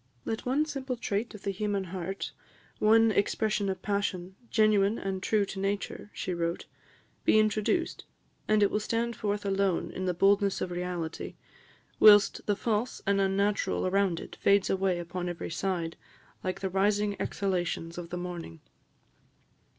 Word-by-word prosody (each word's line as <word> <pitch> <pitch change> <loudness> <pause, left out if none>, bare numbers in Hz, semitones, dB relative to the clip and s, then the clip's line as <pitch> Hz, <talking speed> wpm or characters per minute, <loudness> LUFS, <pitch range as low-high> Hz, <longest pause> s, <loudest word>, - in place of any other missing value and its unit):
"Let 225 +2 -3
one 280 +5 +2
simple 270 -4 -4
trait 220 0 -2
of 210 - -12
the 200 - -1
human 200 0 -1
heart, 185 +1 -5 0.5
one 225 +1 +5
expression 210 0 +1
of 190 -1 -4
passion, 190 -3 -2
genuine 215 -1 +3
and 190 -1 -3
true 210 0 +2
to 195 - -6
nature," 200 +1 -3
she 185 - -3
wrote, 170 0 -2 0.6
"be - - +4
introduced, 215 - +1 0.4
and 215 -1 +4
it 200 - +3
will 210 - +1
stand 230 +2 -1
forth 205 -1 -2
alone 195 -2 0
in 185 - -4
the 180 -1 0
boldness 200 +2 +3
of 180 - -3
reality, 175 -2 -4 0.6
whilst 205 -1 +7
the 205 - +2
false 225 +3 -1
and 200 0 +2
unnatural 200 +1 +1
around 185 -2 +1
it - - -10
fades 200 -1 +3
away 190 -1 +1
upon 175 +1 -4
every 175 -1 -5
side, 170 -2 -2 0.5
like 185 +1 -3
the 190 - -1
rising 205 +2 +2
exhalations 175 -3 -2
of 170 -1 -7
the 180 - -4
morning." 175 - -6
195 Hz, 155 wpm, -29 LUFS, 185-210 Hz, 0.6 s, whilst